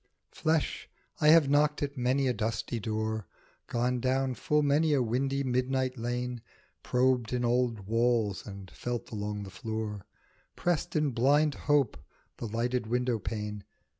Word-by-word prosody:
FLESH, 160 -1 -1 0.3
I 150 - +3
have 155 -2 +7
knocked 150 +1 +3
at 140 0 -3
many 130 +2 +1
a 125 - +2
dusty 115 +2 -2
door, 110 -2 -2 0.4
Gone 125 +1 0
down 130 +1 +1
full 150 +4 +1
many 150 +2 +3
a 140 - +3
windy 135 +4 0
midnight 130 0 0
lane, 120 0 -3 0.4
Probed 125 -2 +1
in 125 -1 0
old 120 -2 +1
walls 115 -1 +1
and 100 -2 -9
felt 120 -1 -4
along 105 -1 -3
the 95 - -9
floor, 105 +1 -5 0.5
Pressed 175 -3 -1
in 150 -2 +2
blind 145 +5 +3
hope 145 -6 +1 0.4
the 115 - -4
lighted 120 +2 -1
window 125 0 0
pane. 105 -1 -4
125 Hz, 145 wpm, -30 LUFS, 110-135 Hz, 0.5 s, have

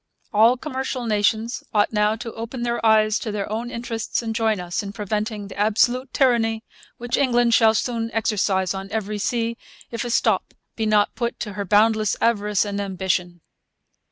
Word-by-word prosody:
All 225 +4 +5
commercial 260 -3 -4
nations 220 +2 0
ought 205 +1 +3
now 210 0 +2
to 230 0 -7
open 230 +2 -6
their 235 -1 -2
eyes 215 -1 +4
to 220 - -4
their 205 -1 -3
own 230 +3 -3
interests 235 -1 -3
and 225 -1 -3
join 220 -3 +1
us 175 +2 -3
in 200 -1 -7
preventing 210 0 -3
the 195 - -10
absolute 240 +5 +2
tyranny 225 -4 +2 0.3
which 240 0 -2
England 240 -3 +3
will 220 -1 +5
soon 230 0 -1
exercise 200 -4 0
on 195 0 -6
every 210 -1 -3
sea 230 +2 -1 0.3
if 230 - -3
a 240 - -4
stop 230 - +1 0.2
be 220 -1 -1
not 210 -1 +3
put 235 -1 -3
to 210 -3 -4
her 200 0 -4
boundless 215 +2 +3
avarice 210 -3 +1
and 205 0 -3
ambition. 185 -3 -2
220 Hz, 175 wpm, -22 LUFS, 205-235 Hz, 0.3 s, All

